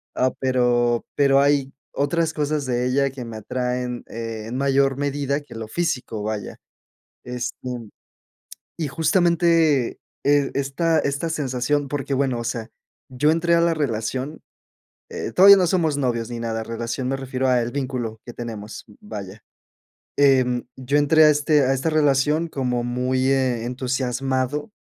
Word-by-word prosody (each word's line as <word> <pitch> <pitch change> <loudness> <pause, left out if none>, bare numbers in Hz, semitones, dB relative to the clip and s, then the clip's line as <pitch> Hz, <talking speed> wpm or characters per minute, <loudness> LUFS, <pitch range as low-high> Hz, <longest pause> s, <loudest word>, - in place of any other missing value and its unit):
Ah, 130 0 +2
pero 120 -2 +2
pero 140 -1 +4
hay 140 -1 +2 0.2
otras 160 +3 0
cosas 150 -1 -1
de 125 -1 0
ella 140 +1 +1
que 130 -2 -7
me 115 -1 -8
atraen, 125 +2 -3
eh, 115 -1 -6
en 120 - -5
mayor 135 0 +2
medida 140 0 -1
que 145 - -13
lo 110 -1 -6
físico, 125 -8 -2
vaya. 105 -1 -4 0.7
Este, 125 0 -4 1.2
y 160 -3 -2
justamente, 165 -3 +2 0.3
eh, 145 -1 +3
esta 155 +4 +1
esta 140 +3 -1
sensación 140 -1 -1
porque 140 -1 -3
bueno 130 -3 0
o 120 - -4
sea, 115 -1 -4 0.4
yo 130 +4 +1
entré 170 +1 +1
a 170 - +3
la 170 0 +3
relación, 130 +1 -3 0.7
eh, - - -5
todavía 200 +2 +9
no 185 - +3
somos 160 -5 +1
novios 115 -4 -1
ni 120 - -4
nada, 115 -1 -3
relación, 115 +3 -4
me 135 - 0
refiero 130 -1 -2
al 120 -2 +2
vínculo 125 -5 -3
que 120 - -7
tenemos, 110 -3 -7 0.2
vaya. 105 -1 -8 0.8
Em, 130 -3 +3
yo 135 +3 0
entré 155 +2 +5
a 155 - +7
este 150 0 +3
a 130 - +2
esta 135 +5 -1
relación 150 +2 +2
como 125 -4 -1
muy, 125 +1 0
eh, 130 -4 +1
entusiasmado, 130 - -2
135 Hz, 150 wpm, -22 LUFS, 120-145 Hz, 1.2 s, todavía